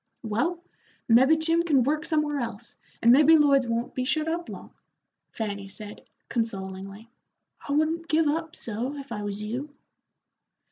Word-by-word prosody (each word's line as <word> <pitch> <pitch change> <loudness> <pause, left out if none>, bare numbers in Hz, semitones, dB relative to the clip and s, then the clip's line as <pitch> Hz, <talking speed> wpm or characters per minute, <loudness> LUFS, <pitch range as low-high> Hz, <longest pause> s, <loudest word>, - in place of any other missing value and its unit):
"Well, 320 +11 -1 0.4
mebbe 265 +7 +5
Jim 330 +1 +2
can 295 -7 +3
work 305 +5 -1
somewhere 300 -2 0
else, 235 -1 -6 0.3
and 235 - +7
mebbe 305 +5 +7
Lloyd's 275 -3 +4
won't 235 +1 -2
be 255 - -2
shut 310 +4 0
up 335 +1 -3
long," - - -9 0.6
Fanny 200 -3 -5
said, 205 +1 -10 0.3
consolingly. 195 -1 -4 0.6
"I - - 0
wouldn't 320 +3 0
give 320 +1 +2
up 320 +2 -2
so, 235 +5 -4
if 275 -3 -9
I 210 -2 -4
was 205 0 -4
you." 245 +8 -4
265 Hz, 150 wpm, -26 LUFS, 220-310 Hz, 0.6 s, and